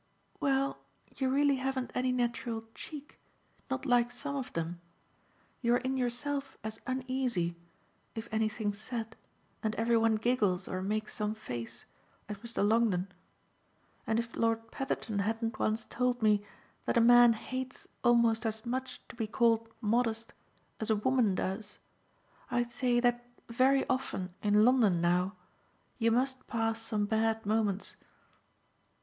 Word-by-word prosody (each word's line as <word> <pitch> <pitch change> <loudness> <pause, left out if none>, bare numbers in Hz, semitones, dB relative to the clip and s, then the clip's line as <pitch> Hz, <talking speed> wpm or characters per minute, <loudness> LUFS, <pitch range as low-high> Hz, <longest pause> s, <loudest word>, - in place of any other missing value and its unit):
"Well, 275 0 +1 0.4
you 265 -1 0
really 280 +1 +3
haven't 260 -1 -2
any 255 0 +1
natural 235 -2 -1
'cheek' 295 +3 -9 0.5
not 265 +1 -2
like 245 -2 +4
SOME 280 +4 -5
of 265 -2 -4
them. 170 +1 -3 0.8
You're 240 -1 +4
in 260 +1 -2
yourself 270 +2 -2
as 220 0 -5
uneasy, 255 -9 -1 0.6
if 225 0 -5
anything's 215 -1 -1
said 225 -1 -5 0.5
and 220 0 -1
every 230 +1 +2
one 225 0 +3
giggles 215 -5 +1
or 185 - -3
makes 210 +2 -2
some 210 0 -2
face, 120 - -6 0.4
as 210 0 -5
Mr. 225 -1 -1
Longdon, 210 -4 +2 1.0
and 220 0 +2
if 235 0 -3
Lord 225 0 0
Petherton 235 -5 -2
hadn't 225 +3 -1
once 220 +1 0
told 250 -1 -1
me 210 -1 +4 0.4
that - - +1
a - - +7
man 240 0 +8
hates 255 +3 -5 0.2
almost 235 -2 +4
as 220 +1 -4
much 260 +2 -3
to - - -11
be 225 -2 -2
called 230 0 +2
modest 230 0 0 0.5
as 220 - -2
a 220 - +4
woman 225 -2 +2
does, 200 +3 -3 0.7
I'd 240 -1 0
say 245 -1 +2
that 240 0 +2 0.3
very 260 +3 +3
often 190 -8 -2
in 210 +1 +5
London 230 -8 +4
now 180 +3 +2 0.6
you 230 -1 +3
must 255 +2 0
pass 225 -1 -1
some 215 -2 -1
bad 220 +1 +1
moments." 210 -2 0
230 Hz, 140 wpm, -31 LUFS, 215-250 Hz, 1.0 s, man